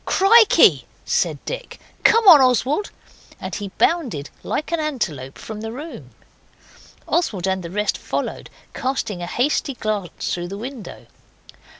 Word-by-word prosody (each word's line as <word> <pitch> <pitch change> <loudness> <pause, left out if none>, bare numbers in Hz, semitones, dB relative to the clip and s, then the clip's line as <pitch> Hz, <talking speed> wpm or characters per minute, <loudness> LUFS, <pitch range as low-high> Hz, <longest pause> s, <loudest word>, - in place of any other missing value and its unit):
'Krikey!' 435 +3 +5 0.2
said - - 0
Dick, - - -6 0.2
'come 455 -1 +5
on, 320 -7 +10
Oswald!' 260 - +2 0.5
and - - -6
he 205 - -4
bounded 250 - 0
like 310 - -3
an 335 - 0
antelope 175 - -3
from 215 -1 -8
the 225 0 -5
room. 295 +7 -9 1.0
Oswald 210 - 0
and 190 -1 -1
the 170 - -7
rest 210 +3 -1
followed, - - -4 0.2
casting 250 -8 -3
a 175 - -4
hasty 270 - 0
glance 210 -6 -3
through 175 0 -3
the 195 +2 -7
window. 245 0 -8
245 Hz, 135 wpm, -21 LUFS, 195-315 Hz, 1.0 s, on